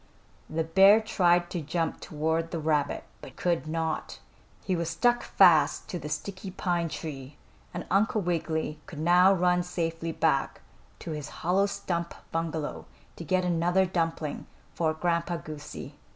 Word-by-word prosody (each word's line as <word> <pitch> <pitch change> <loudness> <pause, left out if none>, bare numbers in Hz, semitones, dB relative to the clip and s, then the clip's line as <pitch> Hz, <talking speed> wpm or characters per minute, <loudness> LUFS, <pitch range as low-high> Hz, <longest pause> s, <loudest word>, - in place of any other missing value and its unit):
The 160 +1 -1
bear 195 +6 +6
tried 175 -5 +2
to 175 - -2
jump 165 +2 -2
toward 160 +2 -1
the 170 - -3
rabbit, 150 -2 0 0.2
but - - -11
could 170 -3 -1
not. 160 0 -2 0.5
He 185 - 0
was 170 -1 -2
stuck 240 +9 +2
fast - - +4
to 180 - -3
the 150 0 -6
sticky 190 +5 -5
pine 175 -3 -1
tree 145 -3 -7 0.3
and 175 - -5
Uncle 210 +3 +3
Wiggily 160 -3 -2
could 160 - -9
now 175 +4 +5
run 180 -1 +3
safely 165 -2 -3
back 155 -4 0 0.4
to 165 - -7
his 150 -1 -5 0.2
hollow 190 +3 +3
stump 170 -3 -3 0.2
bungalow 160 -2 -3 0.3
to - - -8
get 185 +2 +1
another 175 +2 +2
dumpling 165 -4 -2 0.3
for 160 -2 +1
Grandpa 170 +1 0
Goosey. 150 -2 -8
170 Hz, 150 wpm, -28 LUFS, 160-180 Hz, 0.5 s, bear